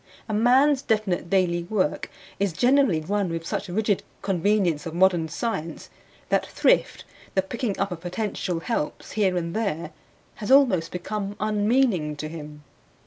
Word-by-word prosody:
A 215 - -3
man's 260 +6 +4
definite 210 -8 -1
daily 180 -2 +2
work 185 -4 -1 0.3
is 200 -3 0
generally 250 - +3
run 200 +3 -1
with 165 0 -4
such 200 - -3
rigid 205 +1 0 0.2
convenience 185 -3 +1
of 165 - -6
modern 175 -3 +3
science 170 -4 -4 0.4
that - - +2
thrift, - - +1 0.3
the 190 - +3
picking 225 +1 -3
up 195 -1 -1
of 170 -2 -6
potential 180 -2 -3
helps 165 -7 -3
here 190 -4 +1
and 170 -1 -3
there, 170 -8 -2 0.5
has 210 - -5
almost 245 -12 +4
become 200 +3 -4
unmeaning 210 - +1
to 155 +1 -5
him. 150 -2 -9
195 Hz, 145 wpm, -25 LUFS, 170-215 Hz, 0.5 s, man's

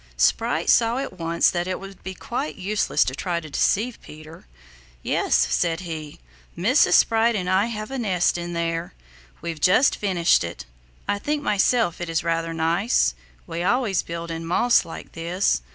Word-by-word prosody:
Sprite - - +1
saw 230 +1 +4
at 265 -9 -5
once 165 0 +2
that 175 0 -2
it 185 - -3
would 195 -1 -11
be 190 0 -7
quite 165 -10 -4
useless 195 -4 +1
to 130 - -2
try 170 +5 -2
to 155 -3 -11
deceive 220 - 0
Peter. 155 - -13 0.6
"Yes," - - +1 0.2
said 165 - 0
he, 160 -4 -7 0.4
"Mrs. 250 +12 +3
Sprite 225 +1 +4
and 185 -3 -2
I 190 +4 +2
have 215 0 -5
a 270 - -3
nest 185 -6 +1
in 175 0 -4
there. 165 0 -3 0.5
We've 165 -3 -5
just 195 - +4
finished 180 - +2
it. 85 -6 -7 0.4
I 205 - 0
think 295 +5 -2
myself 210 - +1
it 175 - -4
is 165 -1 -1
rather 165 0 -1
nice. 165 - +1 0.3
We 165 - -5
always 205 0 +1
build 170 0 -6
in 165 0 -5
moss 180 +9 +3
like 165 - -9
this. 170 - 0
175 Hz, 170 wpm, -23 LUFS, 165-210 Hz, 0.6 s, saw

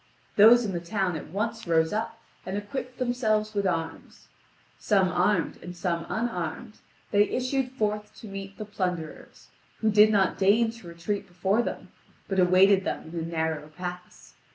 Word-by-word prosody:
Those 230 +3 +7
in 200 - -2
the 175 - -2
town 180 +1 -1
at 155 - -6
once 225 +4 -3
rose 160 0 +2
up 220 +2 -3 0.2
and 190 +2 -4
equipped 250 +5 -5
themselves 220 -4 0
with 200 -2 0
arms. 165 -2 -4 0.5
Some 195 -3 +2
armed 180 0 +1
and 175 0 -9
some 170 -2 -2
unarmed, 215 -1 -3 0.3
they 205 +1 +4
issued 255 0 -1
forth 210 -3 -2
to 225 - -11
meet 195 0 -8
the 215 - -5
plunderers, 180 -6 -5 0.3
who 220 -1 +3
did 210 +1 +7
not 195 -3 +2
deign 215 +4 +4
to 230 -6 -13
retreat 170 +5 -4
before 190 +5 +1
them, - - -5 0.4
but 190 -1 0
awaited 185 +2 +5
them 160 - -4
in 170 - -3
a - - -3
narrow 160 -2 -2
pass. 180 +3 -8
195 Hz, 165 wpm, -27 LUFS, 175-215 Hz, 0.5 s, Those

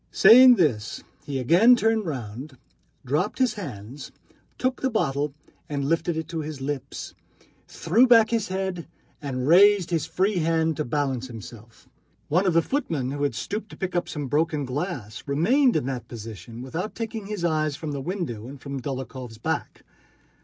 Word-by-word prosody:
Saying 250 +5 +8
this 120 - 0 0.2
he 140 -2 -2
again 175 - +6
turned 225 -3 +1
round, 130 0 -6 0.5
dropped 150 - -1
his 255 -4 +2
hands, 135 - -8 0.5
took 255 0 -1
the 265 - +1
bottle 145 - -1 0.3
and 140 -2 -2
lifted 165 +2 0
it 160 -1 -4
to 165 - -3
his 150 -2 -6
lips, 135 -1 -5 0.5
threw 220 +10 +3
back 230 -2 +6
his 225 -3 0
head, 190 -2 -3 0.3
and 130 -3 -3
raised 190 +2 +6
his 160 -2 0
free 185 +4 0
hand 160 -1 +1
to 150 - -1
balance 130 -1 -1
himself. 115 -1 -12 0.4
One 180 +6 +2
of 180 - +3
the 165 - +5
footmen 160 - -2
who 145 0 -4
had 145 -5 0
stooped 210 - -4
to - - -12
pick 185 -2 -4
up 175 - -1
some 150 -2 -4
broken 150 +1 0
glass 130 - -4
remained 235 - +3
in - - 0
that 130 -2 -4
position 115 0 -9
without 165 +11 -5
taking 225 -3 -5
his 205 -5 -3
eyes 155 -3 0
from 155 +1 -5
the 140 -1 -4
window 140 - -4
and 140 +1 -10
from 140 -1 -6
Dólokhov's 130 -3 -6
back. 115 - -4
155 Hz, 170 wpm, -25 LUFS, 130-190 Hz, 0.5 s, Saying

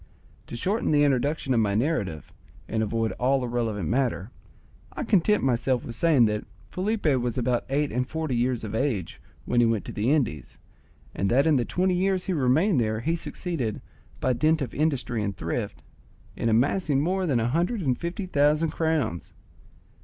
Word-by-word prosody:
To - - -7
shorten 195 - -1
the 145 -1 +4
introduction 140 0 +1
of 120 - +3
my 100 -2 +1
narrative 105 - -1 0.3
and 110 - -1
avoid 110 +1 0
all 130 +1 +2
irrelevant 115 -7 -2
matter, 120 -5 -1 0.6
I - - -4
content 210 -2 +2
myself 125 -1 +1
with 120 - -6
saying 150 -5 +4
that 105 -1 -1 0.3
Felipe 205 +3 -2
was 125 -5 +1
about 125 -1 0
eight 145 +2 0
and 125 +2 -1
forty 160 -5 -2
years 120 0 0
of 110 - -5
age 110 - -2 0.2
when 120 - +1
he 120 - +5
went 115 -3 0
to - - -6
the 110 +6 0
Indies, 115 - -1 0.6
and 100 - -1
that 135 +4 +3
in 160 -2 +4
the 120 - 0
twenty 185 +1 +1
years 185 0 0
he 190 - -1
remained 150 - +2
there 110 0 -1
he 165 +6 0
succeeded, 160 - -4 0.4
by 130 - +1
dint 155 +6 +2
of 120 - -6
industry 135 -6 -1
and 100 -2 -3
thrift, 80 -1 -4 0.5
in 115 - -1
amassing 140 +6 +2
more 185 +5 0
than 130 -6 +2
a 115 +1 0
hundred 175 - 0
and 130 -4 0
fifty 175 +4 -4
thousand 150 -1 +2
crowns. 160 - -1
130 Hz, 180 wpm, -26 LUFS, 115-160 Hz, 0.6 s, he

